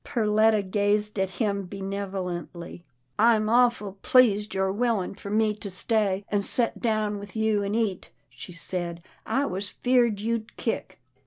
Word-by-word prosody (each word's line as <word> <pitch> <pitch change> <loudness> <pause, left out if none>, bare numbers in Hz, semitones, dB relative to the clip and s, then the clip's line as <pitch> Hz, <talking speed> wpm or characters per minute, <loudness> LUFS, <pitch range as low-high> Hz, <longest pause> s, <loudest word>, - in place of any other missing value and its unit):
Perletta 215 -2 +2
gazed 205 +2 0
at 190 -1 +1
him 200 0 -2
benevolently. 190 -3 -5 0.2
" 125 - -47
I'm 220 -1 +4
awful 230 -5 +2
pleased 215 -6 +3
you're 190 0 +1
willin' 215 -3 0
for 200 0 -9
me 215 +1 +2
to 205 -1 -8
stay, 200 0 +1
an' 205 - +1
to - - 0
set 240 -2 +1
down 215 -3 0
with 200 0 -10
you 220 -1 +1
an' 200 +2 -2
eat," 215 -5 -1 0.2
she - - -11
said, 170 0 -2
" - - -35
I 280 - +2
was 195 -1 0
feared 240 -4 +1
you'd 230 +1 -3
kick." 225 - -4
205 Hz, 165 wpm, -26 LUFS, 190-220 Hz, 0.2 s, I'm